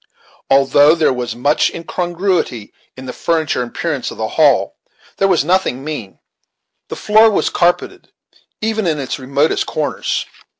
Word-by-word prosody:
Although 140 +3 +5
there 160 -5 +2
was 120 -2 -4
much 145 +5 +1
incongruity 175 - -2 0.2
in 130 - -9
the 125 - -6
furniture 160 -6 -1
and 120 - -4
appearance 145 -1 -3
of - - -10
the 110 0 -3
hall, 145 -5 +2 0.4
there 195 - +2
was 175 -6 +2
nothing 175 -7 0
mean. 145 -10 -6 0.7
The - - -6
floor 215 +1 +4
was 205 - 0
carpeted, 175 +1 -1 0.5
even 220 -2 -1
in 155 -2 0
its 140 0 -4
remotest 140 +4 0
corners. 155 -2 -2
150 Hz, 145 wpm, -17 LUFS, 130-175 Hz, 0.7 s, Although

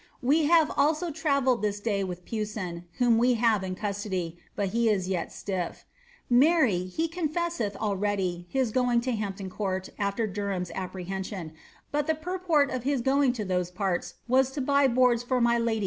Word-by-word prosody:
We 295 +5 +3
have 320 0 +5
sIho 310 +3 +1
travelled 280 -5 +1
this 205 -1 -1
day 205 -2 0
with 180 -1 -6
Pewsoo, 210 -6 -4
ooi 240 -2 +4
we 245 +2 +4
have 225 -4 +2
in 185 -1 -3
custody, 190 -4 -3 0.2
but 200 -2 -1
he 230 +3 +2
is 190 -4 +1
yet 185 -3 -2
siifT. 185 -4 -4 0.4
Marry, 250 - +4
he 320 - -1
confeaseth 330 - -2
htly 195 -4 -1
his 260 -4 0
going 245 0 +2
to 255 +1 -2
Ilam^n 195 -4 -4
Court 190 -2 -3
aAer 200 +1 -1
Derham's 195 -3 -2
apprehension, 190 -2 -5 0.4
but 295 0 0
purport 345 -4 +1
of 255 - -2
hia 280 +3 0
going 270 +2 +3
to 220 -4 -4
those 180 -1 0
parts 185 -1 -2
was 260 +1 +4
to 290 - -4
buy 280 +1 +3
boards 250 -1 +3
for 250 +1 0
my 235 0 +3
lady 230 -1 0
225 Hz, 170 wpm, -27 LUFS, 190-265 Hz, 0.4 s, have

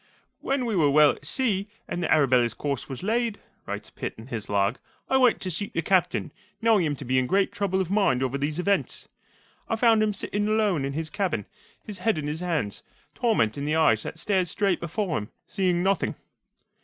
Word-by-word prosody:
"When 270 -2 -1
we 225 -3 -1
were 155 -5 +4
well 150 +1 +6
at - - -10
sea, 205 - +1 0.2
and 175 - -3
the 170 - -1
Arabella's 130 -6 +3
course 140 -2 -3
was 135 +5 -6
laid," 225 +1 0 0.3
writes - - -5
Pitt, - - -5
in 110 - -10
his 115 -4 -5
log, 100 +3 +1 0.3
"I 265 - +5
went 250 -3 +4
to 185 - -2
seek 200 +5 -3
the 165 - -1
Captain, 180 0 +1 0.3
knowing 225 -4 +4
him 145 - -1
to 140 - -8
be 130 +1 +2
in 125 - 0
great 195 +4 +2
trouble 190 -2 -1
of 185 -1 -2
mind 195 -12 +2
over 130 +1 -1
these 150 +2 -1
events. 200 +2 0 0.6
I 225 - +1
found 225 -1 +4
him 210 -1 +1
sitting 205 +1 -2
alone 210 -9 +1
in 140 - -3
his 155 +1 -3
cabin, 170 - -1 0.4
his 205 -4 -8
head 220 -1 +1
in 150 - -3
his 150 +2 -3
hands, 160 - -2 0.3
torment 175 - +1
in 140 - -3
the 150 +1 0
eyes 150 -9 +4
that - - -6
stared 190 -3 +1
straight 195 0 0
before 170 0 -2
him, 105 - -8 0.2
seeing 180 -2 0
nothing." 195 -1 +1
180 Hz, 210 wpm, -26 LUFS, 140-205 Hz, 0.6 s, well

